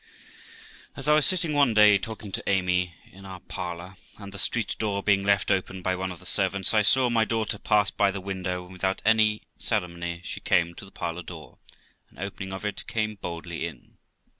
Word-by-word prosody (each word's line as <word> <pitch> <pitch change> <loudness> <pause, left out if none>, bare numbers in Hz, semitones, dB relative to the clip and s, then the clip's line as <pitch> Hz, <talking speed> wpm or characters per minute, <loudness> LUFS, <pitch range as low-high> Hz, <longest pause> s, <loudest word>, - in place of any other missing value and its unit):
As - - -3
I 150 - +6
was 150 -1 +5
sitting 180 -4 +1
one 140 -6 +3
day, 105 -1 +7
talking 110 0 -7
to - - -3
Amy, 90 -2 +1 0.2
in 95 +1 -14
our 95 -1 -8
parlour, 90 0 -6 0.2
and 100 -1 -9
the 100 - -6
street 120 -3 0
door 100 -2 -1
being 100 -1 +3
left 100 -1 +2
open 95 -1 -1
by 95 0 +1
one 95 0 -3
of 90 - -8
the - - -13
servants, 95 0 +3
I 110 - +5
saw 125 +5 +4
my 115 -2 +3
daughter 110 -2 -1
pass 105 -1 +2
by 100 -1 +2
the 100 0 -4
window, 95 -2 -4
and 90 +1 -13
without 95 +1 -2
any 110 -1 +3 0.2
ceremony 85 -1 -2
she - - -5
came 85 0 +2
to 90 - -10
the 100 - -14
parlour 85 0 -4
door, 85 - -11 0.5
and - - -23
opening 95 -1 -6
of 95 +2 -6
it, 105 - -4
came 110 -1 -1
boldly 85 -1 -4
in. 70 -8 -13
95 Hz, 205 wpm, -26 LUFS, 90-105 Hz, 0.5 s, day